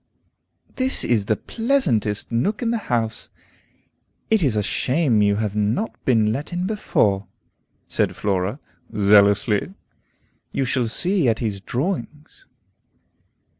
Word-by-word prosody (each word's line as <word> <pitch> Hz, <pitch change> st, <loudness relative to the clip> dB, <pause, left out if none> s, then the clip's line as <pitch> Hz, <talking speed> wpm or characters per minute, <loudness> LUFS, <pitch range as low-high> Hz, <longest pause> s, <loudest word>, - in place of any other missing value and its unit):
"This 260 Hz, 0 st, +3 dB
is 110 Hz, -4 st, +1 dB
the 110 Hz, -, +2 dB
pleasantest 145 Hz, -, -1 dB
nook 200 Hz, -, 0 dB
in 230 Hz, -, 0 dB
the 235 Hz, -, 0 dB
house. 115 Hz, -2 st, -1 dB, 1.0 s
It 220 Hz, -2 st, +4 dB
is 135 Hz, -9 st, +1 dB
a 105 Hz, -, +1 dB
shame 130 Hz, -, +1 dB
you 100 Hz, 0 st, +3 dB
have 105 Hz, -1 st, -2 dB
not 105 Hz, -, 0 dB
been 110 Hz, -4 st, +3 dB
let 145 Hz, +8 st, -5 dB
in 175 Hz, +1 st, -2 dB
before," 105 Hz, -, 0 dB, 0.6 s
said -, -, -1 dB
Flora, 100 Hz, +5 st, -1 dB, 0.4 s
zealously. 100 Hz, -, +3 dB, 0.8 s
"You 135 Hz, -, -1 dB
shall 125 Hz, -1 st, 0 dB
see 180 Hz, -, +1 dB
Etty's 110 Hz, -3 st, -2 dB
drawings." 150 Hz, -, -5 dB
115 Hz, 120 wpm, -22 LUFS, 105-175 Hz, 1.0 s, It